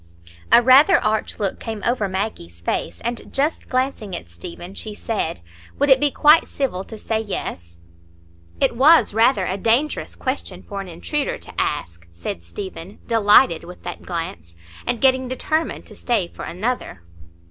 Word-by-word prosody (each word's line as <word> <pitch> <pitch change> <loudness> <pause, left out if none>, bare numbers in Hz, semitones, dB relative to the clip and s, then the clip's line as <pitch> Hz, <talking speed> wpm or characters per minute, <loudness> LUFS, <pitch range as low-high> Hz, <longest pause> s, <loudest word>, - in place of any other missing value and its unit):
A 240 - +7
rather 280 +8 +7
arch 215 0 -1
look 200 -2 -1
came 220 -3 -6
over 235 -4 +1
Maggie's 185 - -4
face, 85 0 -3
and, 235 0 -4
just 290 +4 -1
glancing 255 -7 -1
at 85 - -8
Stephen, 175 - -9
she 210 +1 -5
said, 205 - -3 0.4
"Would 285 0 +3
it 265 - +7
be 290 - +3
quite 300 +3 +5
civil 235 -10 -2
to 220 - -9
say 220 +1 -2
'yes'?" 85 - -5 0.8
"It - - +2
was 295 0 +6
rather 225 -2 +3
a 190 - -2
dangerous 235 +9 0
question 230 -9 -4
for 200 -1 -6
an 195 - -8
intruder 180 - -2
to - - -11
ask," 85 0 -3
said 85 0 -6
Stephen, 185 - -8
delighted 210 -5 +4
with 180 +1 -12
that - - -6
glance, 85 - -6 0.3
and 240 - 0
getting 260 -1 +3
determined 310 +5 -2
to - - -14
stay 225 -8 0
for - - -8
another. 195 - -3
215 Hz, 160 wpm, -21 LUFS, 175-255 Hz, 0.8 s, A